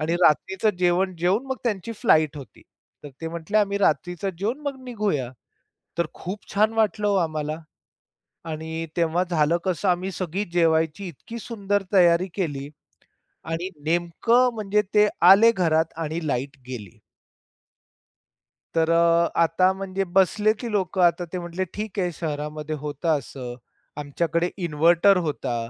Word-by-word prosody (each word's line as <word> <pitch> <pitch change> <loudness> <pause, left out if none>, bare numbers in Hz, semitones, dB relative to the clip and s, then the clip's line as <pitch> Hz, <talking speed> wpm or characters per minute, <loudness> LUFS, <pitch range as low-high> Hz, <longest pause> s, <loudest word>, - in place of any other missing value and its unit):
आणि 160 +2 0
रात्रीच 190 +6 +2
जेवण 180 +1 +2
जेवून 185 +9 +1
मग 265 - -3
त्यांची 225 0 -2
फ्लाइट 155 - +2
होती. 140 - -11 0.4
तर 145 - -6
ते 165 - -4
म्हटले, 170 +5 -3
"आम्ही 200 -1 +1
रात्रीच 180 -1 0
जेवून 200 - -3
मग 275 -2 -5
निघूया." 205 - -2 0.7
तर 170 - +2
खूप 195 +4 -8
छान 215 +2 +3
वाटलं 215 -2 +1
हो 200 - +2
आम्हाला. 155 0 -4 0.9
आणि 160 +1 -5
तेव्हा 170 +1 +2
झालं 165 -1 +2
कसं 185 +1 0
आम्ही 180 +2 0
सगळी 185 +2 -3
जेवायची 165 +2 +1
इतकी 225 - -9
सुंदर 205 -3 -2
तयारी 175 -1 +5
केली 145 -7 -3 0.8
आणि 170 +3 -2 0.2
नेमकं 175 +10 +2
म्हणजे 210 -1 +1
ते 210 0 +5 0.2
आले 225 +4 +7
घरात 165 -5 +1
आणि 160 +3 -3
लाईट 135 +2 -2
गेली. 110 -8 -8 1.8
तर 165 0 +2
अ, 170 0 +4
आता 185 +3 +3
म्हणजे 195 0 -3
बसले, 205 +3 +4
की 235 +1 -6
लोक 190 -3 -1
आता 175 0 +3
ते - - -1
म्हटले, 175 +2 -3
"ठीक 210 -1 -5
आहे, 180 -2 0
शहरामध्ये 150 -1 -4
होत 150 +2 -6
असं, 135 -5 -2 0.4
आमच्याकडे 170 +4 -1
इन्व्हर्टर 170 +5 +4
होता." 125 -4 -2
175 Hz, 140 wpm, -24 LUFS, 160-200 Hz, 1.8 s, आले